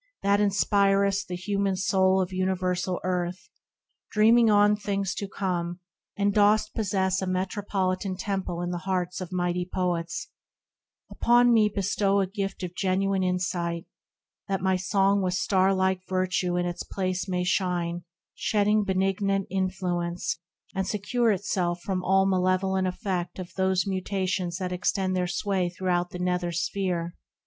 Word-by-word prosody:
that 200 +1 +3
inspir'st 200 -1 +2
The 180 - -4
human 195 +1 -1
Soul 190 0 +2
of 185 +1 -7
universal 185 -1 -1
earth, 180 0 -2 0.6
Dreaming 225 +2 +5
on 205 0 +5
things 200 -2 -2
to 200 - -4
come; 175 -3 -3 0.4
and 200 0 +2
dost 210 +1 +3
possess 190 -3 0
A 190 - -2
metropolitan 185 0 -1
temple 190 -3 -3
in 175 - -2
the 175 - -3
hearts 180 0 -2
Of 185 0 -6
mighty 180 0 -1
Poets; 175 -2 -2 0.8
upon 240 0 +4
me 215 -2 +5
bestow 200 0 +1
A 195 - +2
gift 195 0 -4
of 180 -1 -4
genuine 195 +1 0
insight; 175 -2 -1 0.6
that 195 -1 -1
my 190 +1 +1
Song 195 +2 +2
With 180 -1 0
star 190 +1 +2
like 190 -1 +1
virtue 185 -1 0
in 175 - 0
its 175 -1 -3
place 185 -1 -3
may 180 -1 0
shine, 175 -2 -1 0.3
Shedding 210 0 +2
benignant 195 0 0
influence, 180 -3 -2 0.3
and 190 0 -2
secure 230 +3 0
Itself 180 -3 0
from 185 -2 -2
all 190 +1 +3
malevolent 185 0 +1
effect 180 -2 -3
Of 185 -2 -7
those 190 -1 +1
mutations 185 -2 -2
that 185 -2 -3
extend 185 +1 0
their 180 -1 0
sway 185 0 0
Throughout 180 0 -1
the - - -7
nether 180 -1 -1
sphere 170 0 -2
190 Hz, 145 wpm, -26 LUFS, 180-195 Hz, 0.8 s, Dreaming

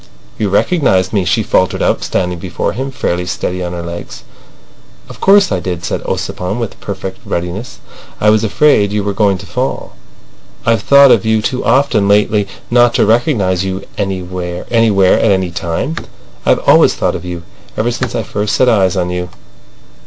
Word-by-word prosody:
"You 105 - 0
recognised 100 - +1
me," 100 -4 +1
she 105 +6 +1
faltered 95 -2 +1
out, - - +1
standing 90 -1 -2
before - - -3
him, 135 +2 -4
fairly 90 -9 -2
steady 90 0 -3
on 90 0 -4
her 85 -1 -5
legs. 85 0 -8 0.8
"Of - - -13
course 195 -1 +5
I - - 0
did," 90 -2 -4
said - - -2
Ossipon 90 +4 -3
with 115 -3 -5
perfect 95 -1 -6
readiness. 90 +7 -4 0.4
"I 105 - +4
was 110 0 +2
afraid 110 -2 +3
you 105 -1 -1
were 100 0 -2
going 100 -2 +2
to 95 - -11
fall. 125 +8 -3 0.7
I've 115 -2 +2
thought 140 +3 +6
of 105 - +4
you 110 0 +2
too 125 +2 -2
often 120 -4 +2
lately 105 0 +2 0.2
not 120 0 +4
to - - +3
recognise 105 - +1
you 95 0 -4
anywhere, 90 -2 -4
at 105 -5 +3
any 95 -2 0
time. 85 - -3 0.5
I've - - +2
always - - +5
thought - - 0
of - - -6
you—ever 90 +6 -5
since 125 +1 -3
I 115 - -1
first 105 +1 -2
set 130 - +3
eyes 95 -5 +2
on 90 -1 -1
you." 90 0 -4
100 Hz, 175 wpm, -14 LUFS, 90-115 Hz, 0.8 s, thought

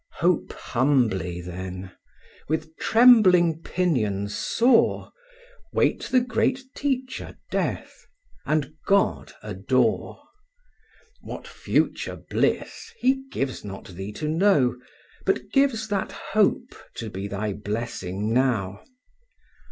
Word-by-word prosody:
Hope 175 0 +1
humbly, 115 -10 0
then; 90 +1 -7 0.6
with 160 +1 -2
trembling 185 -9 +6
pinions 110 - -1
soar; 235 0 +2 0.6
Wait - - +1
the 255 - +3
great 250 +2 0
teacher 260 -2 -3
Death; - - -3 0.4
and 155 0 0
God 200 0 +2
adore. - - 0 1.0
What - - -8
future - - -1 0.2
bliss, 455 - -1
He 265 +1 +2
gives 135 -1 -3
not 95 -1 -8
thee 95 +3 -6
to 150 - -4
know, 155 -7 +3 0.5
But - - +1
gives 265 -6 +2
that 200 -2 -1
hope 215 +4 0 0.2
to 110 -3 -5
be 95 +2 -4
thy 100 +1 -3
blessing 105 -1 -3
now. 110 -7 +1
150 Hz, 100 wpm, -25 LUFS, -, 1.0 s, trembling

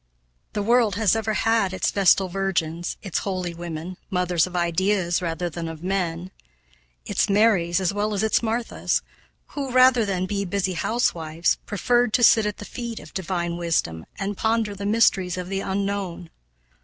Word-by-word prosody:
The 205 - -1
world 230 -2 +3
has 215 0 +3
ever 220 -1 -1
had 225 -5 +2
its - - 0
vestal 195 -1 +4
virgins, 175 -3 -2
its 195 - -1
holy 185 -3 -3
women, 170 +1 -6
mothers 180 -3 +1
of 180 - -10
ideas 175 +1 +1
rather 175 0 -2
than 170 0 -5
of 160 0 -8
men; 180 -1 -2 0.7
its - - 0
Marys, 195 -5 +3
as 190 0 0
well 210 +1 -1
as 200 - 0
its 220 - +2
Marthas, 230 +1 -1 0.5
who, 275 -3 -4
rather 255 -1 +5
than 190 -3 -1
be 200 +1 -2
busy 190 0 -1
housewives, 170 -5 0
preferred 240 +2 +1
to 245 - +3
sit 220 -2 +6
at 210 - -4
the 210 - -8
feet 235 -1 -6
of - - -13
divine 175 -2 -2
wisdom, 155 - -1
and 200 0 -3
ponder 220 -2 0
the 200 0 -5
mysteries 195 -5 +2
of 180 0 -5
the 195 0 -2
unknown. 195 -3 -3
195 Hz, 165 wpm, -24 LUFS, 175-210 Hz, 0.7 s, sit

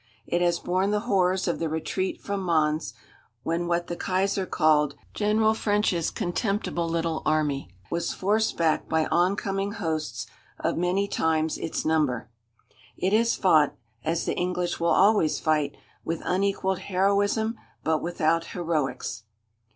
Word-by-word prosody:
It 175 - 0
has 175 -1 +3
borne 185 +3 0
the 210 0 +1
horrors 190 -4 +1
of 170 - 0
the 165 - -1
retreat 175 +4 -2
from 200 -1 -2
Mons, 155 -3 +1 0.5
when 170 +1 -1
what 175 0 0
the 175 - -4
Kaiser 190 +1 0
called 150 -3 +3 0.2
"General 215 +1 +2
French's 205 -6 +1
contemptible 175 -2 -1
little 165 -1 -1
army" 150 -5 0 0.2
was 170 0 -1
forced 215 +3 0
back 160 -2 +1
by 160 -1 +2
oncoming 195 +2 +1
hosts 155 - -3 0.3
of - - 0
many 180 +4 +1
times 160 -4 0
its 160 - -3
number. 150 -8 +1 0.7
It 190 +2 0
has 230 +2 +3
fought, 155 -6 +4 0.3
as 165 +1 -1
the - - 0
English 180 -1 -1
will 170 - +1
always 195 -2 +4
fight, 150 -3 0 0.3
with 165 0 -3
unequalled 190 0 0
heroism 200 +4 +1 0.2
but 160 -1 +1
without 165 -1 +1
heroics. 155 -9 -2
175 Hz, 140 wpm, -26 LUFS, 160-195 Hz, 0.7 s, fought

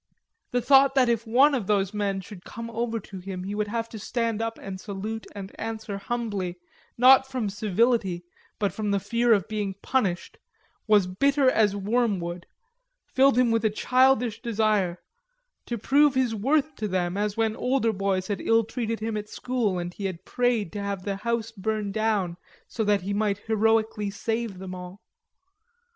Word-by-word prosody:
The 245 -1 -1
thought 270 +1 +5
that 255 -3 +4
if 230 0 0
one 265 +6 +5
of 235 -8 -1
those 200 -1 +1
men 200 -2 -1
should 185 -1 -12
come 230 +1 -7
over 230 0 -2
to 195 -2 -10
him, 185 0 -6
he 195 +2 -4
would 210 0 -1
have 230 +1 -2
to 220 - -8
stand 230 0 -2
up 225 0 -3
and 190 -1 -7
salute 215 +2 -5
and 195 -1 -7
answer 220 -3 -4
humbly, 200 -5 -3 0.4
not 265 +2 +7
from 250 -6 -2
civility, 210 -3 +1 0.3
but 200 -2 -1
from 215 -1 -3
the 200 0 +2
fear 235 +4 +1
of 200 -5 +3
being 210 -3 -3
punished, 200 -10 -1 0.5
was 210 -3 +5
bitter 275 +8 +2
as 210 -4 +2
wormwood, 195 -5 -1 0.7
filled 265 -1 +4
him 250 -2 +4
with 225 0 +1
a 220 - +3
childish 250 +1 +2
desire 215 -6 +1 0.7
to 240 - -2
prove 280 +5 +3
his 255 -3 +1
worth 285 +8 +1
to 215 - -2
them, 180 -2 -1
as 210 +1 -1
when 220 -1 +1
older 250 -2 +1
boys 195 -1 -1
had 205 -2 -2
illtreated 225 0 0
him 220 0 -2
at 210 0 -5
school 235 -7 -1
and 175 0 -4
he 200 - -6
had 185 -3 -5
prayed 245 -7 0
to 205 - -4
have 200 -2 -3
the 195 0 -3
house 235 +1 -2
burn 215 -1 -2
down 205 -5 0 0.3
so 225 - -2
that 205 -3 +2
he 200 +2 -2
might 205 -1 0
heroically 220 -1 +1
save 225 0 -3
them 185 0 -7
all. 180 +1 -9
215 Hz, 180 wpm, -26 LUFS, 195-235 Hz, 0.7 s, not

